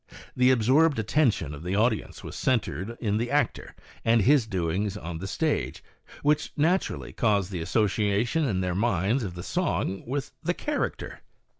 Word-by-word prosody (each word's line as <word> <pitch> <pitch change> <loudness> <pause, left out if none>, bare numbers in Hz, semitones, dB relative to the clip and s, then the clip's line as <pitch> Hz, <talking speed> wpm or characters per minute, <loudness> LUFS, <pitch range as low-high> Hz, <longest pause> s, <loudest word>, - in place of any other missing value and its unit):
The 125 0 +4
absorbed 130 +6 +4
attention 110 - +1
of 75 - -8
the 90 +3 -2
audience 110 +1 0
was - - -7
centred 115 -2 -1
in 105 -2 0
the 120 +2 -1
actor 145 +1 -1 0.3
and 115 -2 +4
his 135 -1 +4
doings 95 +1 -1
on 85 -4 -6
the 95 - -5
stage, 155 +8 -1 0.4
which 150 +1 +2
naturally 170 +6 0
caused 100 -4 +1
the 90 -3 -3
association 105 - +1
in 100 -10 0
their 90 -1 -1
minds 105 +4 +1
of 90 -4 -5
the 90 - -6
song 95 - -1
with 135 +2 -3
the 175 +2 -1
character. 295 -1 -3
110 Hz, 160 wpm, -27 LUFS, 95-135 Hz, 0.4 s, The